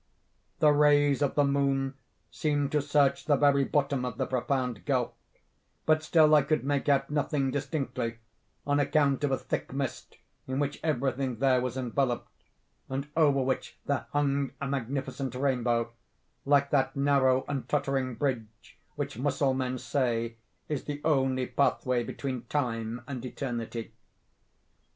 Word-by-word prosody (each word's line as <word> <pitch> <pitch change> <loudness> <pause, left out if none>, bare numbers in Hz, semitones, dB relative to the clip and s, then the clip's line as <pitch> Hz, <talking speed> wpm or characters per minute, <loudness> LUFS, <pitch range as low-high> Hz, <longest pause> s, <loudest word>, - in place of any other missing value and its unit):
"The 150 - +5
rays 145 -1 +4
of 145 - +1
the 145 - +4
moon 140 -1 +1 0.4
seemed 145 -2 0
to 150 - +2
search 145 -1 +2
the 145 - +4
very 140 0 +4
bottom 140 -2 0
of 125 -2 -4
the - - 0
profound 125 -5 -1
gulf; - - 0 0.7
but 155 0 +3
still 155 -1 +4
I 150 - +7
could 150 +1 0
make 145 +1 0
out 135 0 +2
nothing 145 -2 0
distinctly, 135 -4 -3 0.5
on 145 0 +2
account 145 -1 +2
of 145 - +2
a 135 - +1
thick - - -4
mist 135 -1 -4 0.3
in 130 0 -2
which 145 0 -1
everything 135 -3 0
there 130 +1 +3
was 125 0 -3
enveloped, 125 0 -1 0.6
and 135 +2 -3
over 145 -4 +4
which 130 0 -2
there 140 -4 -1
hung 140 -1 0
a 140 - -3
magnificent 135 0 -3
rainbow, 120 -3 0 0.5
like 140 0 +3
that 135 -2 +2
narrow 140 -2 +3
and 135 -4 -4
tottering 135 -3 0
bridge 115 -4 -4 0.2
which 145 -3 -4
Mussulmen 130 -2 0
say 115 -3 -1 0.3
is 150 -3 -3
the 145 -1 -4
only 130 -4 +2
pathway 125 -2 +1
between 130 -1 -5
Time 120 -3 -2
and 130 -4 -5
Eternity. 120 -3 -5
135 Hz, 145 wpm, -29 LUFS, 125-145 Hz, 0.7 s, I